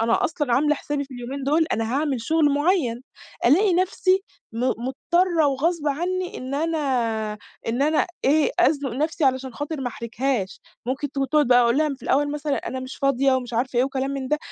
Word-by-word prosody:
أنا 230 +1 +2
أصلًا 295 -7 0
عاملة 295 +4 +3
حسابي 290 0 -3
في 270 -1 -12
اليومين 250 +3 -6
دول 310 +4 +2
أنا 225 +2 -1
هاعمل 285 -4 0
شغل 315 +3 +2
معيّن، 290 -6 +1 0.4
ألاقي 365 - +4
نفسي 370 +1 +2 0.3
م 225 - -6
مضطرة 320 +8 +1
وغصب 300 +3 0
عنّي 360 +5 -2
إن 260 +2 -5
أنا 320 +2 0 0.9
إن 240 +4 0
أنا 305 +2 +2 0.2
إيه 295 +2 +3
أزنق 285 -2 +2
نفسي 305 +5 -1
علشان 260 -1 +1
خاطر 290 +2 -4
ما 255 - -1
أحرجهاش، 235 -3 -3 0.3
ممكن 265 +3 -2
تقعد 280 +1 +2
بقى 245 0 +6
أقول 235 +3 +2
لها 310 0 +2
في - - -24
الأول 290 +2 +1
مثلًا 295 -1 -2
"أنا 260 +2 -4
مش 255 +1 -7
فاضية." 275 0 +2
ومش 250 -2 -3
عارفة 245 +2 -1
إيه 250 - +4
وكلام 270 0 -2
من 275 -2 -4
ده، 300 - +1
275 Hz, 185 wpm, -23 LUFS, 255-310 Hz, 0.9 s, بقى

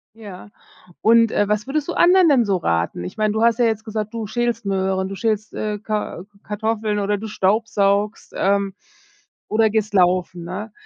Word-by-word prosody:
Ja 205 -4 -11 0.5
und, 230 0 +5
äh, 205 - +1
was 210 +3 -1
würdest 285 +1 -2
du 345 - -2
anderen 360 -1 +5
denn 265 -5 +4
so 195 -2 +1
raten? 85 - -1
Ich 90 - -8
meine, 215 -1 +1
du 220 +1 0
hast 230 0 +3
ja 240 - +4
jetzt 220 -1 -1
gesagt, 215 -1 -4
du 225 -1 -4
schälst 235 +1 -2
Möhren, 190 -1 0
du 195 - -6
schälst, 215 0 -2
äh, 210 -1 -3
Kar 210 -4 -4 0.2
Kartoffeln 215 0 -2
oder 205 +1 0
du 220 +2 -6
staubsaugst, 205 0 0
ähm, 200 0 +1 0.8
oder 220 +1 +3
gehst 215 -1 -1
laufen, 180 -1 +2
ne? 200 +5 -6
210 Hz, 180 wpm, -21 LUFS, 195-225 Hz, 0.8 s, und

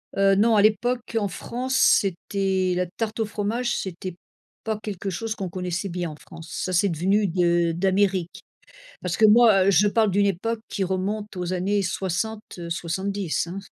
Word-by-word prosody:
Heu, 195 0 +4
non, 225 +2 +4
à 205 - +5
l'époque 225 +3 +1
en 205 - 0
France, 250 +7 -4
c'était 190 -2 +2
la 180 - +1
tarte 215 +5 -5
au 220 - +1
fromage, 220 +4 -2
c'était 185 -1 -5 0.5
pas 220 -1 -2
quelque 200 -2 -5
chose 220 +4 -3
qu'on 190 -4 -4
connaissait 180 +1 -3
bien, 175 -1 -3
en - - -9
France. 165 +1 -13
Ça, 185 - -3
c'est 190 +3 +3
devenu 195 +5 +1
de 175 -1 +2
d'Amérique 190 0 0 0.6
parce 180 -1 -2
que, 220 - +6
moi, 210 -3 +6
je 200 +2 +4
parle 220 0 +2
d'une 200 +2 +2
époque 220 +4 -1
qui 200 - -2
remonte 195 +3 -3
aux 180 0 -3
années 195 +3 0
60-70, 185 -1 -3
hein. 180 +3 -5
195 Hz, 165 wpm, -24 LUFS, 180-210 Hz, 0.6 s, que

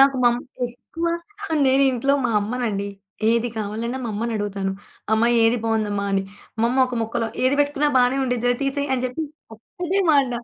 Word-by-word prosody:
నాకు 275 0 +6
మా 240 - +7
అమ్మ 240 - -3 0.3
ఎక్కువ, 330 +7 -6 0.6
నేను 265 +1 +4
ఇంట్లో 270 +3 +2
మా 240 - +2
అమ్మనండి, 215 -2 -2 0.4
ఏది 235 +1 +2
కావాలన్నా 220 +4 -3
మా - - -2
అమ్మనడుగుతాను. 205 -3 -2 0.4
"అమ్మ 220 +1 +4 0.2
ఏది 225 +2 +4
బాగుందమ్మా" 215 -3 0
అని? 195 0 +2 0.4
మా 230 - +4
అమ్మ 255 +2 0
ఒక 255 - -5
ముక్కలో, 230 +1 -1 0.2
"ఏది 255 +2 +3
బెట్టుకున్న 290 0 +1
బానే 250 +1 +4
ఉండిద్దిలే, 245 -1 +1
తీసేయి" 280 +1 -1
అని 255 -1 0
జెప్పి, 255 +6 -2 0.3
ఒక్కటే 355 - -3
మాట, 280 -4 +4
245 Hz, 165 wpm, -23 LUFS, 220-270 Hz, 0.6 s, మా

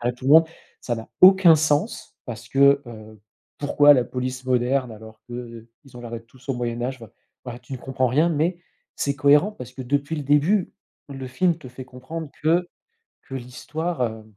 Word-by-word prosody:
à 120 - -4
la 125 - +1
tout-va. 140 +6 +5 0.4
Ça 120 - -2
n'a 115 - -9
aucun 185 -3 +8
sens, 155 +6 -1
parce 120 -2 -8
que, 140 +1 +4
heu, 110 -2 -12 0.4
pourquoi 145 0 +5
la 130 -3 +3
police 125 +1 -5
moderne, 125 0 +1
alors 110 0 -13
que, 120 - -8
heu, 115 -2 -9 0.2
ils 135 - -19
ont - - -9
l'air 120 -1 -8
d'être 115 0 -8
tous 130 +3 -21
au 135 - 0
Moyen 120 -1 -3
Âge, 130 +2 -3
enfin, 110 - -11 0.3
voilà 120 -1 -7
tu 125 +2 -14
ne 130 - -6
comprends 130 0 -1
rien. 150 +8 +2
Mais 170 +3 -1 0.4
c'est 140 - -1
cohérent, 145 +8 +4
parce 125 - -10
que, 130 - -7
depuis 145 +5 -2
le 150 - -4
début, 150 +8 +2 0.4
le 135 -1 -7
film 170 +6 +1
te 130 - -11
fait 125 +1 -10
comprendre 130 +5 -8
que 170 +3 +2 0.6
que - - -12
l'histoire, 150 +6 -5
heu, 110 -2 -4
130 Hz, 200 wpm, -23 LUFS, 120-150 Hz, 0.6 s, aucun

